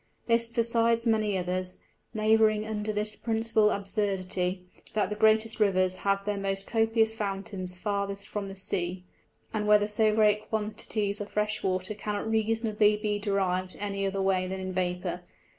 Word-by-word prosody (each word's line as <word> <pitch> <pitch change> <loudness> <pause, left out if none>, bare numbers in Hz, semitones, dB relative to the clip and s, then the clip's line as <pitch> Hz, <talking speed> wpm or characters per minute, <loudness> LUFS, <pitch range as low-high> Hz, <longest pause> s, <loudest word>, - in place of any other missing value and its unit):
This, 230 0 +2
besides 230 0 +2
many 215 -3 +2
others, 185 0 -2 0.4
labouring 215 0 +3
under 215 -1 -3
this 210 0 -1
principal 225 -1 +2
Absurdity, 190 -3 -1 0.3
that 210 0 +1
the - - -1
greatest 220 +1 +3
Rivers 185 -3 +3
have 200 0 0
their 205 -1 -1
most 195 0 -1
copious 225 -1 +2
Fountains 195 -3 -4
farthest 200 0 -2
from 205 -1 -4
the 195 - -8
Sea, 180 -1 -1 0.5
and 210 -1 -1
whether 210 0 +5
so 215 +1 +3
great 210 -1 +3
quantities 210 -1 -1
of 205 - -5
fresh 210 +1 -1
Water 185 +2 -1
cannot 210 0 -4
reasonably 220 -1 +2
be 210 -1 -1
deriv'd 185 -3 -1
any 200 -1 -2
other 195 0 -1
way 185 -1 +1
than 190 +1 -4
in 185 0 -4
Vapour. 180 -1 -2
210 Hz, 155 wpm, -28 LUFS, 195-220 Hz, 0.5 s, whether